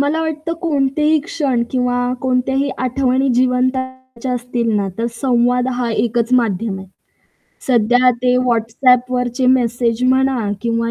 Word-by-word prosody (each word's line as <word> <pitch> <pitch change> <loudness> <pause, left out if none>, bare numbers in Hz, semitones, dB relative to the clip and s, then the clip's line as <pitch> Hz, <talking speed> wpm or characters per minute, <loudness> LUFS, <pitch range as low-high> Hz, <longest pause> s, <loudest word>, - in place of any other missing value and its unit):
मला 295 +3 0
वाटतं 315 +1 -3
कोणतेही 300 -1 +1
क्षण 275 -8 -1
किंवा 245 -1 0
कोणत्याही 265 +2 0
आठवणी 260 +1 0
जिवंत 250 0 +2
करायच्या 260 -1 -6
असतील 240 -1 -3
ना, 200 -1 -1
तर 230 - 0
संवाद 250 -1 +1
हा 245 -1 -2
एकच 235 +2 -1
माध्यम 220 -4 0
आहे. 190 - -10 0.8
सध्या 245 +1 +3
ते 250 0 +3
WhatsAppवरचे 250 +2 +1
मेसेज 240 -2 +1
म्हणा 260 -4 +1
किंवा 230 0 -1
250 Hz, 125 wpm, -17 LUFS, 235-260 Hz, 0.8 s, सध्या